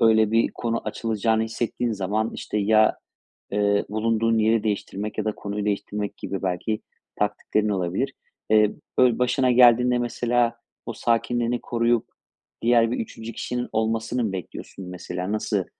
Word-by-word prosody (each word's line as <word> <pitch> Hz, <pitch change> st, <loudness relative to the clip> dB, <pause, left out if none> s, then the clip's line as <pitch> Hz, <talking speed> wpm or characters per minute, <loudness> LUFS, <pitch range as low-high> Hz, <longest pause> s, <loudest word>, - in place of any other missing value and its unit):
öyle 110 Hz, -2 st, +5 dB
bir 115 Hz, +1 st, +3 dB
konu 115 Hz, -1 st, -1 dB
açılacağını 110 Hz, 0 st, 0 dB
hissettiğin 115 Hz, +1 st, -2 dB
zaman, 105 Hz, +3 st, -1 dB
işte, 105 Hz, -, -3 dB
ya, 110 Hz, +1 st, +4 dB, 0.6 s
eee, 100 Hz, 0 st, +2 dB
bulunduğun 115 Hz, +1 st, +1 dB
yeri 110 Hz, 0 st, +3 dB
değiştirmek 105 Hz, 0 st, -3 dB
ya 110 Hz, -, 0 dB
da 110 Hz, -, 0 dB
konuyu 100 Hz, 0 st, -4 dB
değiştirmek 105 Hz, 0 st, -2 dB
gibi 100 Hz, -1 st, -4 dB
belki 95 Hz, +4 st, -1 dB, 0.4 s
taktiklerin 105 Hz, +1 st, 0 dB
olabilir. 95 Hz, +8 st, -1 dB, 0.4 s
Eee, 105 Hz, -1 st, +5 dB, 0.3 s
böyle, 125 Hz, -2 st, +5 dB
başına 125 Hz, +1 st, +2 dB
geldiğinde, 125 Hz, 0 st, +6 dB
mesela, 120 Hz, 0 st, +1 dB, 0.3 s
o -, -, -3 dB
sakinliğini 120 Hz, +1 st, 0 dB
koruyup 120 Hz, -1 st, +1 dB, 0.6 s
diğer 115 Hz, -1 st, +4 dB
bir 120 Hz, -, -2 dB
3. 115 Hz, 0 st, -6 dB
kişinin 125 Hz, +2 st, -3 dB
olmasını 115 Hz, +2 st, 0 dB
mı 105 Hz, -, -1 dB
bekliyorsun, 95 Hz, +1 st, -7 dB
mesela? 90 Hz, +1 st, -4 dB
Nasıl 105 Hz, -2 st, 0 dB
110 Hz, 140 wpm, -24 LUFS, 105-120 Hz, 0.6 s, geldiğinde